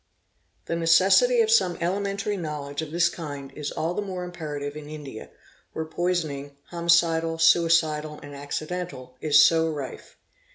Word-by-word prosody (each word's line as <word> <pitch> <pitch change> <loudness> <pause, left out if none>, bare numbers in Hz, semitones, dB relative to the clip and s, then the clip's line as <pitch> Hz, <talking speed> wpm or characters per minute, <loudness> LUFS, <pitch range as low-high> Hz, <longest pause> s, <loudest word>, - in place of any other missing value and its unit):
| - - -44
The 170 - -2
necessity 190 - +4
of 445 -1 +2
some 180 - +3
elementary 200 +3 -1
knowledge 150 -4 -5
of 160 - -6
this 170 +2 +2
kind 145 -5 -7
is 150 -1 -5
all 165 +2 -2
the 210 - -2
more 185 -3 -5
imperative 150 -5 -6
in 150 -1 -9
India, 145 -7 -9 0.4
where 160 - -3
poisoning, 155 -5 -2
homicidal, 170 -1 +2
suicidal, 160 -2 +3
and 145 0 -10
acci 145 +2 -5
dental, 170 -8 -6
is 150 -1 +6
so 165 -1 +3
rife. 145 -4 -7
165 Hz, 155 wpm, -25 LUFS, 150-175 Hz, 0.4 s, is